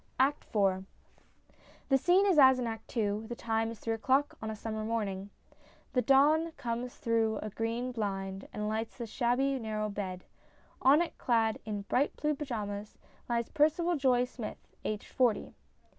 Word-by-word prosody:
] - - -36
ACT 280 +3 +2
IV 190 -2 +2 1.1
The 270 - +5
scene 365 +7 +4
is 370 -6 +4
as 265 -2 +8
in 250 - -1
Act 225 +1 -6
II.; 210 0 0
the 240 - -5
time 225 -1 -1
is 230 - -7
three 225 - -2
o'clock 265 +5 +1
on 220 - -3
a 220 - -4
summer 215 0 -4
morning; 205 -3 -2 0.6
the 250 - +3
dawn 300 +6 +4
comes 245 -2 -4
through 225 -2 +1
a 215 - -5
green 230 +4 -2
blind 195 -4 -3
and 210 0 -3
lights 220 +1 -3
the 240 - -4
shabby 260 +4 +1
narroiv 215 -2 -3
bed; 185 -3 -4 0.6
on 285 +6 +6
it, 345 - -8
clad 225 -3 +2
in 205 -2 -3
bright 260 +7 +1
blue 300 0 +1
pyjamas 210 -8 -5 0.2
', - - -31
lies 235 -1 0
Percival 335 +4 +2
Joye 255 -4 +3
Smith, 245 -3 -8
aged 215 -1 -4
forty. 245 -5 +1
230 Hz, 175 wpm, -31 LUFS, 215-265 Hz, 1.1 s, as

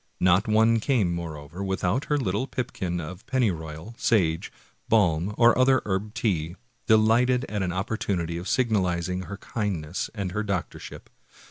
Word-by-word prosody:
Not 90 +3 +3
one 110 +1 +4
came, 110 -8 +1
moreover, 80 +1 -6
without 95 +5 -1
her 150 - +1
little 130 +1 -1
pipkin 95 -10 -3
of 85 +3 -7
pennyroyal, 85 -6 -2
sage, 85 -8 +1 0.4
balm, 95 -2 +2
or 120 0 +6
other 130 +1 +4
herb 105 +2 -2
tea, 85 -6 -1 0.3
delighted 120 +3 +4
at 105 -1 -3
an 90 -2 -1
opportunity 90 -3 -2
of 90 - -7
sig 125 -3 +1
nalizing 90 -2 0
her 100 - -7
kindness 95 -8 -3
and 100 -3 -3
her 105 +2 -1
doctorship. 100 -5 -5
100 Hz, 145 wpm, -26 LUFS, 85-115 Hz, 0.4 s, or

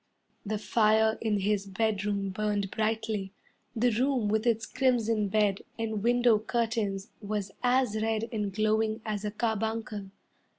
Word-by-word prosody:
The 215 0 -2
fire 220 +1 +3
in 210 -3 0
his 200 0 0
bedroom 205 -1 -1
burned 205 0 -1
brightly. 220 -3 -1 0.4
The 240 +2 +3
room 245 -1 +1
with 220 +2 +1
its 230 -1 +2
crimson 230 -5 +1
bed 205 -1 +1 0.2
and 220 -2 -2
window 240 -1 +4
curtains 220 -3 -1
Was 205 -2 -3
as 245 -3 +2
red 220 0 0
and 210 -2 -1
glowing 215 +2 +1
as 210 -1 -3
a - - 0
carbuncle. 220 -2 -2
215 Hz, 135 wpm, -29 LUFS, 205-225 Hz, 0.4 s, window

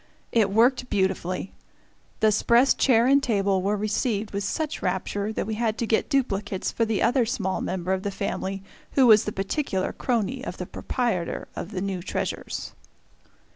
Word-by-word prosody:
It 220 -4 +3
worked 245 +5 +3
beautifully! 190 -1 -1 0.7
The 215 0 +5
"'spress" 235 +5 +4
chair 235 -3 +4
and 275 +2 +5
table 200 -6 +1
were 205 +3 0
received 215 0 -1
with 200 0 -2
such 310 +8 -2
rapture 200 +3 -2
that - - -2
we 220 - -3
had 220 0 -1
to 235 - -1
get 220 0 +1
duplicates 210 -9 -1
for 230 - +1
the 220 -2 0
other 250 0 +3
small 200 -5 -2
member 185 0 -2
of 190 - -1
the 200 - -2
family 195 -1 -3 0.3
who 270 - +5
was 215 -3 +7
the 210 - -2
particular 195 0 -2
crony 250 +1 -1
of - - -6
the - - -4
proprietor 230 -10 -2
of - - -5
the 195 -4 -4
new 195 -2 -2
treasures. 175 - -4
210 Hz, 175 wpm, -25 LUFS, 195-235 Hz, 0.7 s, was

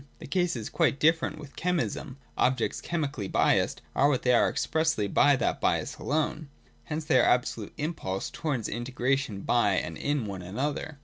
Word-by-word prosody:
The - - -10
case 175 +2 0
is 115 -2 -4
quite 155 -4 +2
different 160 +2 +2
with 145 -2 -11
chemism. 160 -5 -2 0.2
Objects 125 -2 +1
chemically 145 - -3
biassed - - +2
are 140 +2 +4
what 130 -4 0
they 125 - +4
are 120 - +4
expressly 160 -10 0
by 145 +7 +4
that 130 - -1
bias - - 0
alone. 155 0 -1 0.4
Hence 155 0 -4
they 130 - +4
are - - +6
the - - +4
absolute 120 -4 0
impulse 145 - -3
towards 135 -9 -2
in 120 +2 -4
tegration 125 -4 -1
by 110 -5 +3
and 80 -2 -2
in 145 -4 -1
one 100 -2 -5
another. 140 - -3
135 Hz, 180 wpm, -28 LUFS, 115-155 Hz, 0.4 s, are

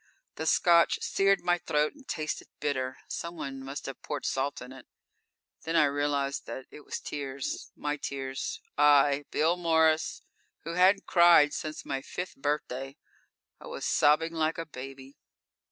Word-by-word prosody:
The 160 - -4
Scotch 170 0 +5
seared 195 0 +2
my 175 0 +1
throat 150 -2 0
and 280 -3 -18
tasted 155 -1 -3
bitter; 130 -3 -2
someone 140 -6 -5
must 135 +2 -6
have 135 - -7
poured 145 -2 -5
salt 135 +2 -1
in 125 0 -10
it. 130 - -13 0.7
Then 165 +1 -3
I 155 - +6
realized 145 -1 0
that 130 - -6
it - - -11
was - - -5
tears 140 -2 -5
my 150 0 -2
tears. 135 -2 -4 0.2
I, 145 -1 +5
Bill 165 +3 +2
Morris, 160 -2 +2 0.4
who 165 - -5
hadn't 190 +3 +4
cried 170 -4 +6
since 155 0 -5
my 135 -1 -3
fifth 180 +6 -6
birthday 135 -2 -3 0.6
I - - -11
was - - -5
sobbing 160 +3 +3
like 160 0 0
a 165 - -4
baby. 135 -1 -10
150 Hz, 155 wpm, -29 LUFS, 135-165 Hz, 0.7 s, I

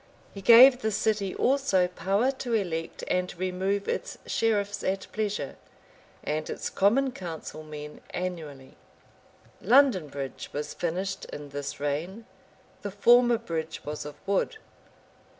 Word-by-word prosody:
He 200 - -8
gave 250 +5 +8
the 220 - +1
city 210 -2 0
also 255 -9 +2
power 195 +8 +1
to 260 -3 -5
elect 165 -6 -3
and 180 0 0
remove 185 +2 -1
its - - -3
sheriffs 205 -3 0
at 190 0 -1
pleasure, 210 -8 -3 0.7
and 155 +1 -2
its - - -4
common 255 +7 +3
council 165 -6 -7
men 150 -1 -9
annually. 155 -7 -6 0.8
London 240 - +5
bridge 140 -2 -6
was 150 +1 -4
finished 185 +3 -3
in 145 -1 -8
this 140 0 -5
reign: 160 +10 -3 0.6
the 205 - -4
former 240 +4 +5
bridge 165 -8 -5
was 150 0 -4
of 150 0 -8
wood. 200 - 0
190 Hz, 130 wpm, -27 LUFS, 155-220 Hz, 0.8 s, gave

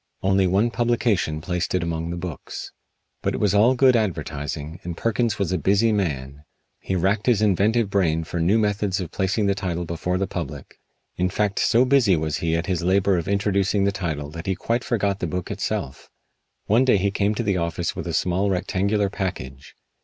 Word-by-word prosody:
Only 95 0 +3
one 100 +6 +2
publication 115 -10 0
placed 90 +2 -2
it 90 - 0
among 85 -1 -3
the 85 - -4
books. 85 -3 -7 0.5
But - - -1
it - - -3
was 105 -2 +2
all 115 +6 +5
good 130 0 +5
advertising, 80 -5 -3
and 85 -1 -5
Perkins 115 -1 0
was 100 -3 -1
a 95 - 0
busy 100 +7 +3
man. 70 -8 -2 0.4
He 95 - -3
racked 95 +5 0
his 120 -5 +4
inventive 105 +1 +2
brain 80 -5 +1
for 85 +2 -4
new 90 +7 +3
methods 105 -3 0
of 90 -2 -5
placing 100 +3 0
the 100 - +3
title 90 -3 -3
before 85 +2 -2
the 95 - 0
public. 85 -7 -7 0.4
In 90 +1 +1
fact 100 +1 -1
so 120 +3 +4
busy 125 -8 +4
was 80 -1 -1
he 85 -1 0
at 85 0 -1
his 90 -2 -1
labor 95 +2 +2
of 85 - -6
introducing 100 0 +1
the 100 - +2
title 80 -7 -4
that 85 +3 -8
he 95 - +1
quite 115 +6 -1
forgot 100 -4 0
the 85 - -2
book 90 +2 -4
itself. 65 - -4 0.6
One 115 +5 +4
day 130 -5 +4
he 100 +1 0
came 100 +1 0
to 120 - -1
the 100 -4 +1
office 85 0 -2
with - - -5
a - - -3
small, 95 +3 +1
rectangular 100 +2 0
package. 70 - -5
95 Hz, 200 wpm, -23 LUFS, 85-105 Hz, 0.6 s, all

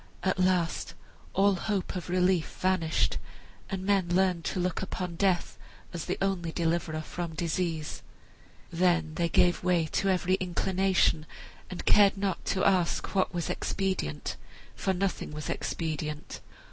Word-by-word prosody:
At 185 -1 +1
last 180 -2 +1 0.4
all 200 +1 +4
hope 190 +1 -2
of 180 -1 -5
relief 180 -2 +1
vanished, 185 -4 +1 0.5
and 190 -1 -3
men 195 -3 +3
learned 180 -1 +2
to - - -1
look 180 0 -1
upon 180 -2 -4
death 185 -1 +1 0.3
as 170 -2 -4
the 185 - -2
only 180 -4 0
deliverer 165 -2 -1
from 170 0 -5
disease. 165 -1 -2 0.7
Then 170 -2 +2
they 170 +1 0
gave 175 +2 +3
way 175 -2 +3
to 195 - +1
every 185 -1 +2
inclination, 185 -3 +1 0.4
and 185 - -6
cared 200 -1 +6
not 195 -3 -1
to 190 - +1
ask 185 -3 +2
what 190 -2 +2
was 175 -3 -2
expedient, 190 - -2 0.4
for 190 - 0
nothing 190 0 -1
was 150 0 -4
expedient. 155 -2 -4
180 Hz, 140 wpm, -29 LUFS, 165-190 Hz, 0.7 s, cared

